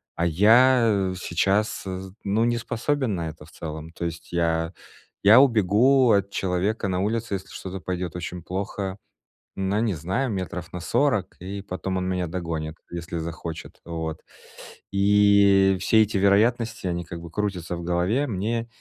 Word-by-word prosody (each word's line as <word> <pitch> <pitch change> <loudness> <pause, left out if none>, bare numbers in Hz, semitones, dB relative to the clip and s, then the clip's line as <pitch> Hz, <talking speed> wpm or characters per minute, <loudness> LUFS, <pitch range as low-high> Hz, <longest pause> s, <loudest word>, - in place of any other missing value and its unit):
А 85 - 0
я 110 +2 +4
сейчас 95 +4 0
з 95 0 -6
ну, 105 +3 +2
не 120 0 +1
способен 120 0 -1
на 85 -2 -3
это 75 -1 -12
в 80 - -18
целом. 80 0 -7
То 85 - -7
есть 85 0 -6
я 80 0 0 0.5
я 110 +6 +8
убегу 120 +2 +4
от 100 -2 +2
человека 100 +3 -1
на 90 -1 -1
улице, 110 +1 -1
если 95 0 -4
что-то 95 0 -7
пойдет 90 0 -4
очень 90 0 -5
плохо, 95 +2 -4 0.6
ну, 95 +2 0
не 115 -3 +1
знаю, 95 - -2
метров 90 -2 -5
на 90 - -4
40, 105 0 0
и 100 +3 -6
потом 95 -1 -4
он 90 - -2
меня 90 -1 -1
догонит, 80 -2 -4
если 85 0 -5
захочет. 85 0 -7
Вот. 80 -2 -4 0.7
И 100 -1 +5
все 110 +3 +4
эти 105 -2 +1
вероятности, 110 +2 +2
они 85 -1 -2
как 85 0 -8
бы 85 - -9
крутятся 90 -2 -3
в 85 - -6
голове. 90 +11 +1
Мне 115 +1 -2
95 Hz, 160 wpm, -24 LUFS, 85-105 Hz, 0.7 s, я